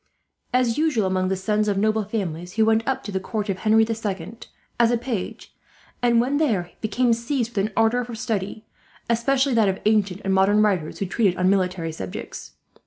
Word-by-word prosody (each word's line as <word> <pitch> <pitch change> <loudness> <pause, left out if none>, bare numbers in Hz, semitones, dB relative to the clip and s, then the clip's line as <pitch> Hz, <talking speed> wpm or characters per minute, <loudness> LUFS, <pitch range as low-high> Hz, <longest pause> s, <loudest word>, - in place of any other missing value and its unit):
As 250 0 +1
usual 295 -10 +2
among 185 0 0
the 190 - 0
sons 210 +3 0
of 200 -1 0
noble 215 +1 +1
families, 180 -4 -4
he 220 - +3
went 220 0 +3
up 265 - -1
to 205 - -6
the 190 - -1
court 210 +2 -4
of 190 -1 -2
Henry 220 +1 +4
the 225 +1 -1
Second 220 +1 -5 0.3
as 235 -1 +5
a 240 - +2
page; 230 -5 -5 0.5
and 240 -1 +4
when 265 +4 +1
there 210 - 0
became 235 +3 +2
seized 235 0 -2
with 195 - +1
an 215 - -13
ardour 225 +2 +3
for 240 -1 -7
study, 215 -1 -3 0.5
especially 265 +3 +2
that 220 -4 +4
of 190 - -1
ancient 205 -3 +2
and 195 - +1
modern 200 +2 +4
writers 185 -7 0
who 200 - -2
treated 195 -1 +1
on 185 +1 +3
military 180 -4 0
subjects. 95 - -7
215 Hz, 200 wpm, -23 LUFS, 190-235 Hz, 0.5 s, as